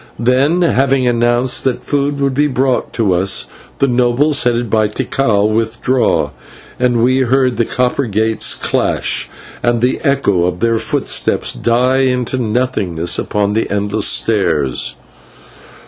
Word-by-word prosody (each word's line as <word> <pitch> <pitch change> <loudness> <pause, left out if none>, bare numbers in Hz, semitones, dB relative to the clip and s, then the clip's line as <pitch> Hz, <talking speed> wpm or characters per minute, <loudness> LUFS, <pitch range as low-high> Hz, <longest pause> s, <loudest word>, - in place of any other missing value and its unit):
Then, 135 +9 +2
having 135 -4 +1
announced 120 +1 +1
that 130 -2 -1
food 145 0 -1
would 140 -1 0
be 145 +3 +2
brought 130 -2 -1
to 105 -5 +1
us, 95 +3 +1 0.3
the - - +2
nobles, 125 +3 +2
headed 120 -1 0
by 110 0 +1
Tikal, 105 -1 0
withdrew, 115 +3 0 0.5
and 120 -2 +1
we 130 +2 +2
heard 130 0 +1
the 115 - +1
copper 125 +3 -1
gates 110 +1 0
clash - - -1 0.3
and 120 -1 +1
the 125 +2 0
echo 100 -11 +1
of 90 0 -2
their 115 -1 +1
footsteps - - -1
into 125 +1 +1
nothingness 105 -8 -1
upon 105 0 -1
the 110 - -1
endless 105 +1 0
stairs. 80 - 0
120 Hz, 130 wpm, -15 LUFS, 110-130 Hz, 0.5 s, Then